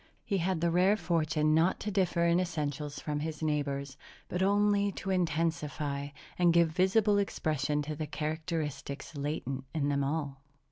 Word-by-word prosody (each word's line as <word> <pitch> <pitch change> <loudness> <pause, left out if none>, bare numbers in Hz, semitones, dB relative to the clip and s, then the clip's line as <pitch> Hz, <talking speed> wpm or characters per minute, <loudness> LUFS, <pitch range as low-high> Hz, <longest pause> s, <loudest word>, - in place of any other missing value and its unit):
He 200 -3 0
had 180 -1 0
the 170 0 +2
rare 185 +5 +4
fortune 155 -4 +1
not 165 +4 +3
to 210 - -2
differ 180 -3 +2
in 170 +1 +4
essentials 150 -4 -3
from 150 -1 -3
his 155 0 -4
neighbors, 140 -2 -1 0.3
but 180 - -2
only 205 +1 +3
to 195 - -4
intensify 155 -5 -1 0.3
and 175 -1 +5
give 170 -1 +5
visible 200 +5 +3
expression 150 -6 0
to 155 +1 -4
the 155 0 -4
characteristics 155 -1 -4
latent 140 -2 -3
in 145 -2 +1
them 140 -1 +1
all. 140 -1 -2
160 Hz, 155 wpm, -31 LUFS, 145-180 Hz, 0.3 s, and